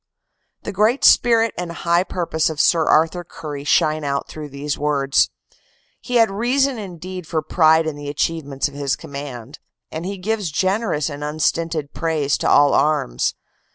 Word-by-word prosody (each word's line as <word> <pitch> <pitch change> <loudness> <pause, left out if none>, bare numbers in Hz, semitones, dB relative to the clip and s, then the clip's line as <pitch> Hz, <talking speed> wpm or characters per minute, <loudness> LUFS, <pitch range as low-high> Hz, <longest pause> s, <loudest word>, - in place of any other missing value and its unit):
The - - -4
great 215 +7 +2
spirit 230 -2 +5
and 175 -1 -4
high 170 +1 +1
purpose 170 -4 -1
of 155 -2 -6
Sir 165 -1 +3
Arthur 165 +3 +3
Currie 150 -4 -8
shine 155 +1 +2
out 140 -1 -2
through 150 -1 -8
these 140 +1 -4
words. 140 -2 +1 0.7
He 250 - -5
had 225 -4 +4
reason 250 +4 +1
indeed 185 -2 -8
for 155 -1 -2
pride 160 -1 +3
in 155 -2 -3
the 145 0 -7
achievements 145 -2 -2
of 145 - -11
his 140 -1 -1
command, 140 -1 -8 0.3
and 160 +1 -5
he 195 +2 -4
gives 205 -1 -2
gen 190 +8 0
erous 150 -10 -1
and 145 -1 -6
unstinted 155 0 -1
praise 155 -4 0
to - - 0
all 145 0 +5
arms. 145 - +1
160 Hz, 165 wpm, -20 LUFS, 145-185 Hz, 0.7 s, spirit